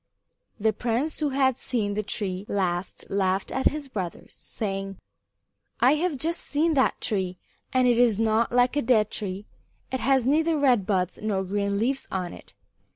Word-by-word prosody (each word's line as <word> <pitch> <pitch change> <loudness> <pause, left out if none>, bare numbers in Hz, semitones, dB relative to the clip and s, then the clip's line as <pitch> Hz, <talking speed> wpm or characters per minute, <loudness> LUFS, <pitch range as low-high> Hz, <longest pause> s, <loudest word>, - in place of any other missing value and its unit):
The 220 +1 +2
prince 245 +8 -1
who 300 -2 +1
had 265 -2 +1
seen 210 -5 0
the 210 - -1
tree 195 -2 -2
last 180 -2 -1
laughed 190 -1 0
at 265 - +1
his 300 -1 -2
brothers, 190 -9 -6
saying: 195 -2 -5 0.8
"I 250 +4 +5
have 310 -1 0
just 330 +5 -1
seen 315 +3 +1
that 265 -3 +2
tree, 190 -4 -1 0.3
and 255 -1 +3
it 240 -1 +3
is 235 -4 +4
not 225 +1 +2
like 245 +2 +3
a 290 - +2
dead 225 -4 +3
tree. 195 0 -4 0.5
It 260 - -1
has 265 -2 +2
neither 315 +4 +2
red 250 -9 +3
buds 185 -3 0
nor 205 -3 -1
green 200 +1 -1
leaves 265 +6 -1
on 180 -2 -3
it. - - -14
225 Hz, 170 wpm, -26 LUFS, 195-265 Hz, 0.8 s, I